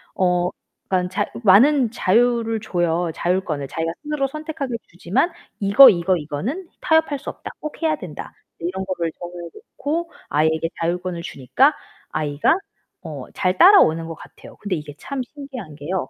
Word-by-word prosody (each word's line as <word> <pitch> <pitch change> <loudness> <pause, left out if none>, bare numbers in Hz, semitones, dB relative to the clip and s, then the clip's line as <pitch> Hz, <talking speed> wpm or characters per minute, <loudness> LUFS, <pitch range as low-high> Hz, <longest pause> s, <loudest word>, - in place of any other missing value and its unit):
어 180 -1 +2 0.4
그러니깐 180 -1 +1
자 - - 0 0.2
많은 240 +5 +5
자유를 230 +1 +2
줘요. 175 -4 0
자율권을. 175 -6 -1
자기가 165 0 -2
스스로 295 -2 -1
선택하게 305 -3 -5
주지만 180 - 0 0.3
이거 205 +7 +9
이거 180 -2 +2
이거는 190 - -4
타협할 320 -3 +2
수 - - -6
없다. - - -8
꼭 305 +2 -7
해야 315 -1 +2
된다. 175 - -8 0.3
이런 185 +3 -3
거를 175 -3 -2
정해서 175 -1 -7 0.3
놓고 330 +4 -2 0.2
아이에게 160 +2 +1
자율권을 175 +1 -2
주니까 245 - +2 0.4
아이가 150 - +1 0.5
어, - - -7
잘 185 -1 0
따라오는 165 - +6
것 165 - -6
같아요. - - -14
근데 205 -3 -2
이게 150 -2 -7
참 275 -2 -4
신기한 260 - -9
게요. 155 0 -3
185 Hz, 340 characters per minute, -21 LUFS, 170-270 Hz, 0.5 s, 이거